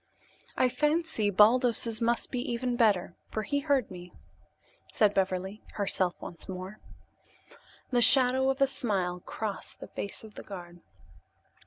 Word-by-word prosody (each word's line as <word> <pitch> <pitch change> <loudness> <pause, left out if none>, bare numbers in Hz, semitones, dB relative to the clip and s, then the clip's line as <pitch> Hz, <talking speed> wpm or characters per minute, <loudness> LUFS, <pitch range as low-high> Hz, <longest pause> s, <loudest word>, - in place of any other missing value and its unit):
"I 255 - +4
fancy 300 -5 0
Baldos's 230 +2 +4
must 235 +1 0
be 250 - -2
even 245 +1 -1
better, 210 -8 +2 0.2
for 215 - -3
he 285 +7 -1
heard 280 -5 0
me," 180 -1 -10 0.8
said 210 -2 +3
Beverly, 190 +2 -1
herself 190 -3 +1
once 170 - -9
more. 185 +2 -7 1.1
The 245 -1 +3
shadow 260 +1 +5
of 270 +1 -1
a - - +7
smile 195 -9 -1
crossed 210 +3 -5
the - - -8
face 200 - -6
of 215 -1 -12
the - - -9
guard. 175 -3 -10
215 Hz, 140 wpm, -29 LUFS, 190-250 Hz, 1.1 s, a